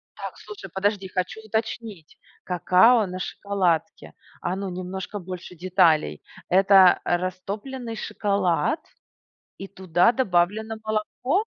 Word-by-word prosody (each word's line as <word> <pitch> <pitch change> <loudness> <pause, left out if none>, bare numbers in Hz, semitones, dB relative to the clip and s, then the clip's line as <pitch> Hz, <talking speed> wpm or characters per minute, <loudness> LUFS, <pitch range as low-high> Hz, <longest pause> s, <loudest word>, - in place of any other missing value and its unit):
Так - - -7
слушай, 425 - -10
подожди, 195 0 0
хочу 185 +4 -3
уточнить, 220 -5 -5 0.3
какао 185 +6 +4
на 185 0 -6
шоколадке. 190 -2 -2 0.3
А, 175 - -2
ну, 195 0 -4
немножко 185 +2 -5
больше 180 -1 -8
деталей. 170 - +2 0.3
Это 190 -1 +6
растопленный 200 +7 -3
шоколад 200 - 0 0.8
и 195 - -7
туда 185 +1 +2
добавлено 220 -1 0
молоко? 245 - -1
190 Hz, 105 wpm, -24 LUFS, 180-215 Hz, 0.8 s, Это